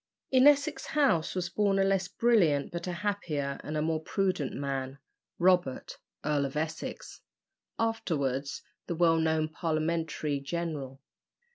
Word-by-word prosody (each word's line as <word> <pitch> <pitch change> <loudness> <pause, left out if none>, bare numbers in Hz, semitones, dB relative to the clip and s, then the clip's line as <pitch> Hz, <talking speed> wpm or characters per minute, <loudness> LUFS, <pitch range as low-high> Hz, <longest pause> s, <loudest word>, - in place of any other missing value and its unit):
In 260 +1 +6
Essex 290 +1 +3
House 265 - +2
was 180 -2 -1
born 200 -1 +2
a 195 - +4
less 195 -1 +1
brilliant 180 -14 +2
but 170 +1 -5
a - - -1
happier 150 -9 -2
and 155 +1 -3
a 150 - 0
more 160 0 0
prudent 185 -4 -1
man 135 -1 -3 0.4
Robert, 175 -7 +1 0.3
Earl 145 -2 +1
of 135 - -7
Essex, 160 +1 -5 0.6
afterwards 150 - -1 0.2
the 170 - -2
well 165 -1 +4
known 160 -1 +1
Parliamentary 155 -2 -1
general. 140 -3 -4
160 Hz, 135 wpm, -29 LUFS, 145-190 Hz, 0.6 s, In